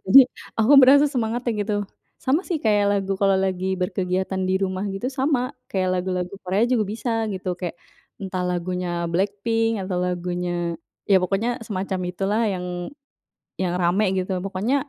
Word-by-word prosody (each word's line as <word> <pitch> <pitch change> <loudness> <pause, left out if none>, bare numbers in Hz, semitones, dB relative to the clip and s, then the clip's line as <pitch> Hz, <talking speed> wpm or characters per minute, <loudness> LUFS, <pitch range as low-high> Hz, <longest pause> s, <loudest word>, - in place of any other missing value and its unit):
jadi 260 +8 +10 0.4
aku 225 +6 +4
merasa 280 +3 +7
semangatnya 240 0 -1
gitu, 210 +1 -2 0.5
sama 280 +6 +3
sih 345 - 0
kayak 210 -2 +3
lagu 195 -1 0
kalau 195 -1 +4
lagi 185 -1 -1 0.2
berkegiatan 190 0 -1
di 185 - +2
rumah 185 0 -1
gitu 215 +6 -3
sama 270 -1 +2 0.3
kayak 185 -1 0
lagu-lagu 180 0 -2
Korea 190 +4 +1
juga 225 -4 +3
bisa 235 +2 -3 0.2
gitu 185 0 -5
kayak, 175 -2 -4 0.5
entah 185 -1 -3
lagunya 180 +1 -2 0.2
BLACKPINK 205 +5 +1
atau 185 -1 -3
lagunya, 180 0 -2 0.6
ya 195 - +7
pokoknya 195 +5 0 0.2
semacam 190 -2 -3
itulah 195 +4 -1
yang, 180 -1 -4 1.0
yang 180 -2 0
rame 180 +5 +2
gitu 185 +1 -2
pokoknya 195 +6 -1
195 Hz, 150 wpm, -23 LUFS, 185-220 Hz, 1.0 s, jadi